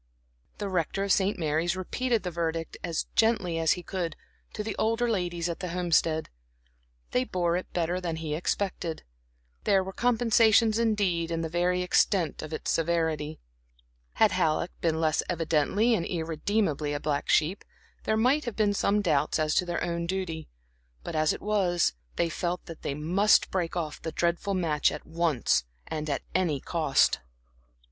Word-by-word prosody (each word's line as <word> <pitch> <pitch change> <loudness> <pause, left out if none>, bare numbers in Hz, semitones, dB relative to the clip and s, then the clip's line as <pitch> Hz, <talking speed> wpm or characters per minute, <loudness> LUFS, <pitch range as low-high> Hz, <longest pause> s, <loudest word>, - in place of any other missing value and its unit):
The 205 - -3
Rector 185 +1 -1
of 200 - 0
St. 195 +1 +2
Mary's 160 +2 0
repeated 230 +5 -1
the 180 - -3
verdict, 165 -1 -3
as 170 -2 -1
gently 205 -7 +2
as 160 -1 +4
he 180 - -7
could, 170 -3 -3 0.4
to 210 - -3
the 215 -1 -4
older 230 +2 +1
ladies 175 -6 -1
at 170 - -4
the 180 - -4
Homestead. 165 -2 +1 0.8
They 125 - +2
bore 175 +2 0
it 180 - -4
better 175 +1 -1
than 170 -2 -2
he 160 -2 -4
expected. 175 0 -2 0.6
There 195 -1 +3
were 190 +1 -7
compensations 230 -2 +4
indeed 200 -7 +1
in 165 -1 -1
the 165 - -3
very 180 +2 +1
extent 180 -2 +2
of 155 - -7
its 155 - -2
severity. 160 -2 0 0.7
Had - - +4
Halleck 160 +2 +1
been 160 -1 +1
less 160 -1 +2
evidently 170 +7 +2
and 205 - +1
irredeemably 160 -2 -1
a 145 - -2
black 145 -1 -2
sheep, 165 +5 +2 0.4
there 220 - +1
might 265 +7 +3
have 235 - -4
been 210 -2 +2
some 205 +1 +1
doubts 155 -4 +2
as 155 -1 +1
to 180 - +2
their 175 -1 -2
own 170 0 -2
duty; 170 -4 -3 0.5
but, - - -5
as 155 0 +3
it - - -5
was, 185 - +2 0.2
they 170 - +1
felt 175 +2 -3
that 165 - -10
they 140 - -3
must 180 +8 +3
break 180 -2 -1
off 155 -3 -4
the 160 - -4
dreadful 175 +4 0
match 155 -5 +2
at - - -7
once, 160 - +1 0.2
and 155 -1 -4
at 140 - -1
any 170 -6 +1
cost. 155 -2 +2
175 Hz, 170 wpm, -28 LUFS, 160-195 Hz, 0.8 s, as